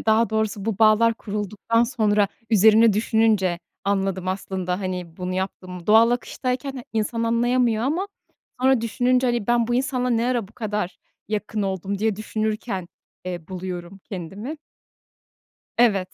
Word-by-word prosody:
Ya, - - -9
daha 220 +1 +4
doğrusu 220 -2 -1
bu 220 -3 -2
bağlar 225 +1 +5
kurulduktan 210 +2 -1
sonra 215 -4 +2 0.2
üzerine 220 +1 +6
düşününce 215 -4 +2 0.3
anladım 195 -2 0
aslında, 185 -1 -2
hani, 180 -3 -4
bunu 180 0 -3
yaptığımı. 185 -1 -5
Doğal 225 +2 +6
akıştayken 250 +2 -2
ha 250 - -6
insan 225 +1 -1
anlayamıyor 235 0 +2
ama 330 +9 0 0.5
sonra 260 -2 +4
düşününce, 250 +3 +1
hani, 240 -4 0
ben 240 -1 +3
bu 240 - 0
insanla 255 -1 0
ne 235 +1 +2
ara 240 -6 0
bu - - -21
kadar 210 -5 -3 0.3
yakın 210 0 -2
oldum 195 0 -2
diye 215 -1 0
düşünürken, 215 -3 -3 0.4
eee, 175 -3 -6
buluyorum 185 0 -6
kendimi. 200 - -6 1.2
Evet. 200 -6 +3
215 Hz, 140 wpm, -23 LUFS, 190-235 Hz, 1.2 s, üzerine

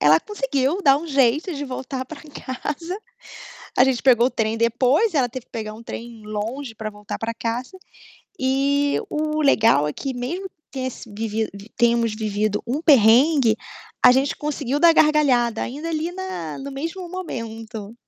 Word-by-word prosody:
ela 155 +2 +6
conseguiu 280 -3 -1
dar 275 -1 +5
um 335 - -7
jeito 280 +4 +2
de 285 0 -4
voltar 260 0 -5
pra 300 +3 -10
casa. 300 +4 -5 0.8
A 250 - +8
gente 260 -3 0
pegou 245 -3 +5
o - - 0
trem 225 -2 -1
depois, 255 - +2
ela 255 -4 +2
teve 255 +1 -8
que - - -49
pegar 215 -2 -5
um 225 - -11
trem 230 -1 -8
longe 225 +4 -4
pra 215 0 -5
voltar 210 0 -7
pra 225 0 -2
casa. 240 - -4 0.6
E 280 +2 +1
o 305 0 -1
legal 225 - +4
é 150 - -3
que, 270 -1 -4
mesmo 335 +11 -4
que - - -51 0.2
tem 260 -2 -4
esse 245 -2 -7
vivido 220 +1 -2 0.3
tenhamos 235 -2 +2
vivido 210 -1 -1
um 270 +6 -1
perrengue, 260 -2 +5 0.5
a - - +9
gente 270 +3 +2
conseguiu 290 -2 -2
dar 335 +1 +7
gargalhada 275 -8 +3
ainda 295 +6 -4
ali 325 +1 -2
na 360 - -5
no 280 +1 -6
mesmo 330 +7 -5
momento. 225 - -6
260 Hz, 170 wpm, -22 LUFS, 225-295 Hz, 0.8 s, a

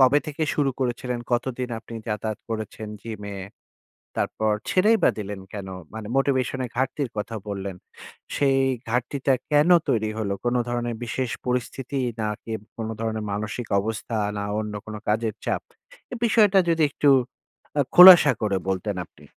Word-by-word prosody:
কবে 130 +2 +6
থেকে 155 +1 -4
শুরু 140 -2 +2
করেছিলেন, 125 -1 -2
কতদিন 125 +1 -1
আপনি 115 - -11
যাতায়াত 105 0 -2
করেছেন 110 -1 -5
জিমে? 105 -3 -6 0.8
তারপর 110 0 0 0.2
ছেড়েই 210 +5 +4
বা - - +6
দিলেন 100 -1 -5
কেন? 100 -2 -6 0.3
মানে 110 -1 -6
মোটিভেশন 135 -1 +1
এর 120 - -6
ঘাটতির 135 +2 -1
কথা 105 +2 -3
বললেন। 100 -2 -4 0.6
সেই 135 -1 +3 0.3
ঘাটতিটা 130 +3 0 0.2
কেন 150 +2 +4 0.2
তৈরি 110 -2 +1
হল, 105 -2 -2
কোন 120 0 +1
ধরনের 120 -1 -2
বিশেষ 120 +1 -2 0.2
পরিস্থিতি 125 +2 -2 0.2
নাকি 105 +1 -4 0.2
কোন 110 -1 -4
ধরনের 110 -1 -2
মানসিক 110 +3 -3
অবস্থা 110 +2 -4 0.2
না 100 - -2 0.2
অন্য 105 -1 -5
কোন 110 - -7
কাজের 110 0 +1
চাপ? - - -1 0.5
এ - - -2
বিষয়টা 210 -3 +5
যদি 165 -1 +3
একটু 145 +1 +1 0.7
আ - - +5
খোলাসা 180 -5 +11
করে 100 -3 +1
বলতেন 95 +1 -1
আপনি। - - -20
120 Hz, 150 wpm, -24 LUFS, 105-135 Hz, 0.8 s, খোলাসা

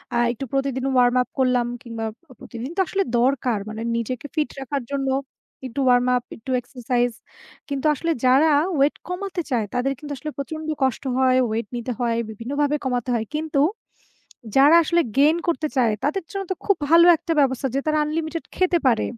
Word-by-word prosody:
আ - - +2
একটু 245 +3 -5
প্রতিদিন 270 -1 -1
Warm 245 0 +4
up - - -4
করলাম 250 -2 +2
কিংবা 230 -3 -5 0.3
প্রতিদিন 240 +2 -7
তো - - 0
আসলে 390 0 0 0.2
দরকার 250 -3 +1
মানে 220 +1 -6
নিজেকে 235 +3 -3
ফিট 305 -2 0
রাখার 270 0 -3
জন্য 275 -1 -1 0.6
একটু 255 +1 -5
Warm 245 0 +4
up, 245 - -1
একটু 235 +4 -7
এক্সারসাইজ 245 -1 -1 0.6
কিন্তু 280 +1 -3
আসলে 330 +4 -2
যারা 270 +5 +5 0.3
ওয়েট 280 +2 +3
কমাতে 360 0 -3
চায় 230 -4 +1
তাদের 250 +2 0
কিন্তু 295 -1 -8
আসলে 305 +4 -6
প্রচন্ড 310 +3 -5 0.2
কষ্ট 260 -1 0
হয়, 260 -1 +4
ওয়েট 220 0 -2
নিতে 240 +1 -3
হয়, 235 -2 0
বিভিন্নভাবে 280 +7 -1
কমাতে 250 -1 -1
হয়। 225 -1 -2
কিন্তু 310 -2 0 0.9
যারা 285 +4 +7
আসলে 340 +2 +2 0.2
Gain 295 +4 +5
করতে 315 -2 0
চায় 235 -4 +3
তাদের 315 +7 0
জন্য 395 -1 -3
তো - - 0
খুব 400 - +3
ভালো 335 +1 +7
একটা 330 - -5
ব্যবস্থা 270 -1 +2
যে - - +2
তারা 310 0 +1
আনলিমিটেড 315 +1 -3
খেতে 370 -1 +2
পারে। 235 -3 +3
270 Hz, 180 wpm, -23 LUFS, 245-305 Hz, 0.9 s, যারা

